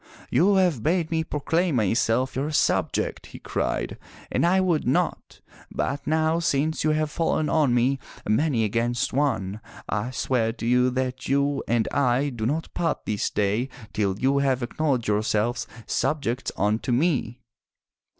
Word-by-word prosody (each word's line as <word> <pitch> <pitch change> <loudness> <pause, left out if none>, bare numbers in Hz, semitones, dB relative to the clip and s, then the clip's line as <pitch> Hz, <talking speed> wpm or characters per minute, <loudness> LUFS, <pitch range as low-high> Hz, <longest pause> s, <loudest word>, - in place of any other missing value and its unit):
"You 200 +3 +4
have 180 - +2
bade 165 +4 0
me 160 -1 +1
proclaim 160 +2 0
myself 115 +3 +1
your 140 +3 -1
subject!'' 150 - 0
he - - -11
cried, - - -3 0.3
and - - +2
I 185 +2 +4
would 175 -5 +1
not, - - -1 0.3
but 140 - -3
now 160 +1 +2
since 155 -1 0
you 155 - +2
have 155 0 0
fallen 155 -2 0
on 145 -6 +3
me, 130 +3 +2 0.3
many 115 +2 +2
against 120 +4 0
one, 110 -8 0 0.3
I 110 +3 -2
swear 125 -3 0
to 115 - -7
you 125 +1 +3
that 130 0 -3
you 140 +1 +1
and 115 -1 +1
I 135 +1 +2
do 115 -4 -3
not 155 +5 -2
part 165 -1 -1
this 105 -1 -1
day 105 +6 0 0.2
till 100 -3 0
you 135 +4 +2
have 135 -2 +1
acknowledged 130 -1 -1
yourselves 105 +2 0 0.2
subjects 140 -4 -1
unto 105 +4 0
me! 130 -3 +1
130 Hz, 150 wpm, -25 LUFS, 115-155 Hz, 0.3 s, You